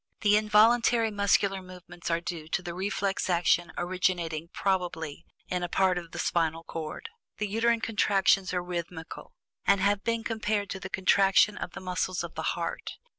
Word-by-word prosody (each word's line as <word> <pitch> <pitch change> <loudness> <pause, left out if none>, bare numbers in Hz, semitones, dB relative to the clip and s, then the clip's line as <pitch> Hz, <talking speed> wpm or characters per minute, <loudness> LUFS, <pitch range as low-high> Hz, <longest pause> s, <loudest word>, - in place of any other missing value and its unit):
The 210 -1 +4
involuntary 225 +2 +4
muscular 200 -1 +2
movements 180 -1 -9
are 165 0 +1
due 170 -2 -6
to 180 +3 -2
the 175 -1 -5
reflex 195 +1 -1
action 175 0 +2
originating, 175 -3 -1
probably, 170 -5 -2 0.2
in 180 -1 -2
a 175 - -3
part 185 0 +2
of 170 -1 -11
the 175 - -9
spinal 165 -2 0
cord. 160 -2 -6 0.3
The 210 - -1
uterine 225 +2 +1
contractions 195 -3 +2
are 180 -1 -1
rhythmical, 170 -2 -6 0.3
and 200 - +4
have 200 +1 +1
been 230 -1 -1
compared 215 -3 -1
to 190 - -4
the 190 - -7
contraction 195 +2 +4
of - - -6
the - - -8
muscles 185 0 -2
of - - -7
the - - -4 0.2
heart. - - -4
185 Hz, 170 wpm, -28 LUFS, 175-205 Hz, 0.3 s, The